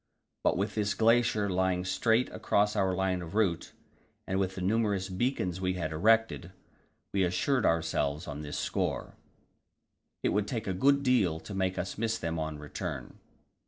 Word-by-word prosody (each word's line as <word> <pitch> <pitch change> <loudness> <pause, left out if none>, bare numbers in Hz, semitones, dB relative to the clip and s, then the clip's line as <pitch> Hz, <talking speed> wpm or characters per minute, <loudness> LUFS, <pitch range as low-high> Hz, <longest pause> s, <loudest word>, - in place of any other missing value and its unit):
But - - +2
with 100 +3 -1
this 105 -2 0
glacier 115 -2 +3
lying 95 -1 0
straight 115 +6 +2
across 105 +1 +1
our 95 -3 +1
line 95 -1 0
of 85 +3 -8
route, 100 -7 +1 0.5
and 95 +1 -1
with 95 -1 -1
the 95 - -5
numerous 100 -1 +1
beacons 95 -3 -1
we 95 0 0
had 80 -3 -3
erected, 110 +1 +2 0.6
we 100 - +1
reassured 95 +8 +2
ourselves 80 -2 0
on 75 0 -5
this 75 -1 -5
score. - - -2 1.1
It - - +2
would 105 0 0
take 115 -3 -3
a 95 - -1
good 140 +8 +3
deal 110 - +2
to 105 - -8
make 95 -1 -1
us 90 +3 -4
miss 115 0 0
them 80 -1 -3
on 80 -1 -3
the 75 - -10
return. 75 - -6
95 Hz, 170 wpm, -30 LUFS, 90-110 Hz, 1.1 s, glacier